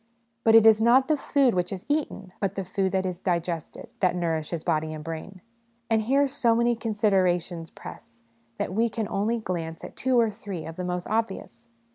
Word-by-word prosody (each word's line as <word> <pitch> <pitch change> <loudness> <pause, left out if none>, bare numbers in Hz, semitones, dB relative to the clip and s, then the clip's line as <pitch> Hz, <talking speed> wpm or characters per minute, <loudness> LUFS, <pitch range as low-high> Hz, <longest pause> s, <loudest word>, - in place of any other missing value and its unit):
But 225 0 +5
it 225 -1 +8
is 220 -1 +7
not 250 +3 +5
the 310 - +3
food 275 -3 +2
which 180 -1 -1
is 190 -2 -6
eaten, 285 -11 -2
but 195 -1 -1
the 195 - -3
food 190 +1 -1
which 190 0 +1
is 180 -1 -3
digested, 170 -3 -3
that 180 -2 +2
nourishes 165 -2 -2
body 155 -2 0
and 155 - -8
brain. 165 +4 -7 0.5
And 220 -1 +4
here 270 +6 +3
so 245 -4 +2
many 235 +1 +2
considerations 185 -7 0
press, 115 0 -12 0.3
that - - -3
we 230 +3 +2
can 220 -1 -3
only 210 +5 0
glance 170 -6 -4
at - - -9
two 255 -2 +2
or 225 -2 +3
three 200 -5 -7
of 160 - -7
the 180 - -5
most 180 0 -3
obvious. 195 - -3
190 Hz, 195 wpm, -26 LUFS, 175-225 Hz, 0.5 s, it